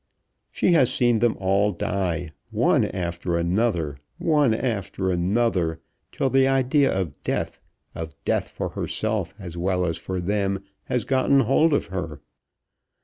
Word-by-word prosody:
She - - +2
has 135 -7 +4
seen 120 -3 +3
them 120 0 +2
all 100 +2 +2
die, 90 -4 -2 0.2
one - - +3
after 85 -1 -2
another, 85 -5 0 0.2
one 150 -6 +3
after 100 -5 -1
another, 90 -2 +1 0.3
till 135 - 0
the 135 0 +4
idea 135 +1 +3
of 95 -7 -3
death, - - -3 0.3
of 80 -1 -6
death - - 0
for - - -4
herself - - -2
as 85 -4 -7
well 90 0 +1
as 85 -1 -2
for 95 +1 -4
them, 100 +1 -1 0.2
has 125 -4 -1
gotten 135 +1 +3
hold 135 +7 +3
of 145 - +2
her. 85 -6 -4
100 Hz, 145 wpm, -24 LUFS, 85-125 Hz, 0.3 s, has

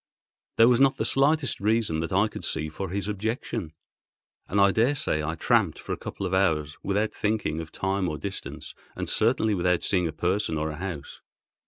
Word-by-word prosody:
There 115 - +7
was 125 -1 +4
not 135 -1 +4
the - - -1
slightest 140 -1 +2
reason, 105 -6 +1
that 80 +3 -3
I 100 +3 +3
could - - -8
see, 80 - -2
for 95 +4 -5
his 100 +1 -2
objection; 105 -3 -3 0.8
and 100 - 0
I 100 0 +6
daresay 115 - +1
I 80 +2 -2
tramped - - +2
for - - -5
a - - -4
couple 100 - -6
of 90 - -3
hours 80 -6 +1
without 105 +2 0
thinking 105 -7 -1
of 80 - -9
time 95 -1 -1
or 75 - -4
distance, 95 +6 -7 0.2
and - - -4
certainly 110 -1 +2
without 90 -2 +1
seeing 90 -3 +1
a - - -3
person 90 -1 0
or 80 +1 -1
a 75 - -7
house. 90 -5 -6
95 Hz, 195 wpm, -26 LUFS, 80-110 Hz, 0.8 s, There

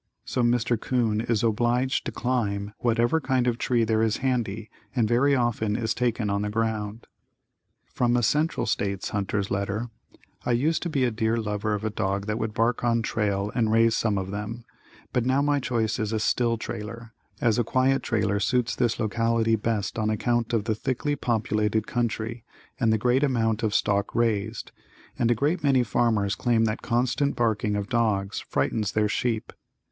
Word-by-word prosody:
So 125 - -1
Mr. 120 -1 +1
'Coon 115 -4 +1
is 115 -2 0
obliged 120 +3 +1
to - - -3
climb 105 -5 -1
whatever 120 +6 +2
kind 130 -3 +1
of 120 - +2
a - - -11
tree 120 -3 +2
there 110 0 +1
is 110 -1 +1
handy 115 -4 -1 0.3
and 115 -3 +2
very 130 +5 +3
often 115 -4 0
is 115 -1 0
taken 120 -3 0
on 100 0 0
the 105 - -2
ground. 110 0 -2 0.8
From 120 -1 +1
a 120 - +1
Central 150 +8 +1
States 100 -1 -1
hunter's 100 -1 -2
letter: 100 +4 -2 0.5
I 125 - +1
used 150 +7 +1
to 175 - -2
be 140 -5 0
a 125 - +2
dear 110 +1 0
lover 105 -1 -1
of 105 - -5
a 110 - -1
dog 100 -1 -1
that 105 +2 -2
would 110 -1 -3
bark 115 +1 +1
on 115 -1 +2
trail 105 -3 -1
and 110 -3 +1
raise 115 0 +4
some 105 -3 +1
of 95 0 -3
them, 105 +3 -5 0.5
but 125 - +2
now 130 +2 +2
my 145 0 +2
choice 115 -4 -1
is 110 -1 -1
a 110 - 0
still 115 +1 +1
trailer, 115 +1 -7 0.3
as 115 -1 +2
a - - +3
quiet 130 +4 +2
trailer 105 -3 0
suits 120 +3 +1
this 120 -3 0
locality 115 +1 +1
best 110 0 -2
on 110 0 +1
account 120 +2 0
of 115 -3 +1
the 110 0 0
thickly 130 +6 -2
populated 110 -4 0
country 115 -1 -2 0.4
and 115 -4 +3
the 110 - +3
great 125 +4 +2
amount 115 -5 +1
of 110 -2 0
stock 100 0 +1
raised, 110 -1 -1 0.5
and 120 - +2
a 120 - +4
great 150 - 0
many 135 -3 +4
farmers 110 -3 +1
claim 115 0 +2
the 110 -1 0
constant 125 +4 0
barking 110 -2 0
of 100 -1 -2
dogs 105 -5 0
frightens 95 +9 -1
their 105 0 +2
sheep. 115 +1 -2
115 Hz, 185 wpm, -26 LUFS, 105-120 Hz, 0.8 s, raise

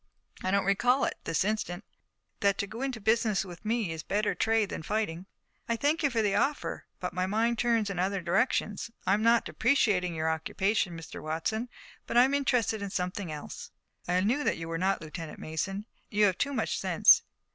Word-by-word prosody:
"I 185 - -1
don't 200 0 +2
recall 240 +7 +3
it, - - -1
this 165 +3 +1
instant." 210 -3 -2 0.6
"That 200 -1 +2
to - - -1
go 220 +4 -8
into 265 -4 -2
business 220 -2 +2
with 175 -3 -10
me 220 -4 0
is 160 -1 -4
a - - -24
better 210 +1 0
trade 220 -2 +1
than - - -5
fighting." 185 -1 -2 0.4
"I 230 - +2
thank 290 +7 +1
you 290 - +3
for 230 -4 0
the 205 -2 +1
offer, 290 +2 -1
but - - -4
my 185 0 0
mind 225 +3 +1
turns 230 -3 +2
in 195 -3 -3
other 195 +2 0
directions. 205 +4 0 0.2
I'm 200 +3 +3
not 230 +1 +4
depreciating 205 -9 +2
your 160 0 -1
occupation, 180 +3 0
Mr. 165 - -8
Watson, 190 +10 -2 0.4
but - - 0
I'm 260 +3 +6
interested 250 -6 +1
in 200 - -3
something 180 -1 -3
else." 150 -1 -7 0.4
"I 180 +1 +2
knew 245 +9 +1
that - - +1
you 165 0 -6
were 165 0 -3
not, 190 +1 +1
Lieutenant 160 0 -7
Mason. 195 +6 -3 0.2
You 210 -1 +3
have 190 -3 +1
too 280 - +1
much - - -1
sense. - - +6
200 Hz, 200 wpm, -29 LUFS, 180-230 Hz, 0.6 s, I'm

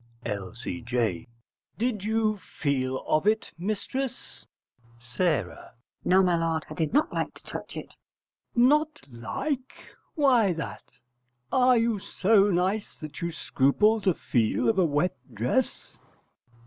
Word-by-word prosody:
L.C.J. 115 0 -3 0.5
Did 220 -3 -1
you 215 -1 +1
feel 130 -6 -2
of 155 +6 +1
it, 220 +1 +1
mistress? 225 +7 -4 0.5
S. 120 0 -16 0.8
No, 190 +1 +5
my 180 -2 +3
lord, 165 -1 0
I - - -3
did 160 0 -1
not 295 +6 +2
like - - -2
to - - -14
touch - - -7
it. - - -8 0.6
L.C.J. 240 +1 +7
Not 305 +2 +2
like? 260 - -3 0.4
Why 250 - +4
that? 165 - -5 0.7
Are 255 -1 +5
you 230 -2 +1
so 200 +1 +3
nice 190 +3 0
that 155 -2 -9
you 170 0 -1
scruple 185 +9 +2
to 185 -4 +2
feel 115 0 +1
of 190 - +2
a 185 - +5
wet 150 +3 +1 0.2
dress? 120 - -1
185 Hz, 130 wpm, -27 LUFS, 140-225 Hz, 0.8 s, L.C.J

